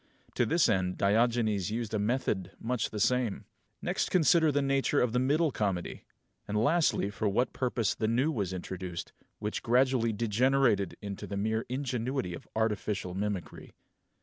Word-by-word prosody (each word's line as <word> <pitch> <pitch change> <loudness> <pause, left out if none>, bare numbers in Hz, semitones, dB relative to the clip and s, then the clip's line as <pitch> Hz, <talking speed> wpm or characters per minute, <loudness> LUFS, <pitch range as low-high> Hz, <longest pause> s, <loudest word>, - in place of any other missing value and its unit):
To - - +1
this 165 0 +3
end 95 -4 0
Diogenes 110 -1 +2
used 115 0 -3
a 110 - +1
method 105 -4 -1
much 120 -1 -1
the 105 - -5
same. 125 -2 +1 0.4
Next - - -1
consider 165 -2 +4
the 145 - +1
nature 135 +1 +2
of 125 -2 +1
the 125 - +2
Middle 150 +5 +2
Comedy; 95 -7 -3 0.4
and 105 - -1
lastly 145 - +2
for 105 0 -1
what 120 +6 0
purpose 120 -5 0
the 110 - -2
New 125 +7 +2
was 100 - -2
introduced, 90 -1 -6 0.2
which 105 0 -3
gradually 125 -1 +2
degenerated 115 -1 +2
into 100 -1 -6
the 100 - -4
mere 110 +2 -1
ingenuity 130 -5 -2
of 85 - -9
artificial 105 -4 -1
mimicry. 95 -4 -4
110 Hz, 155 wpm, -30 LUFS, 100-130 Hz, 0.4 s, consider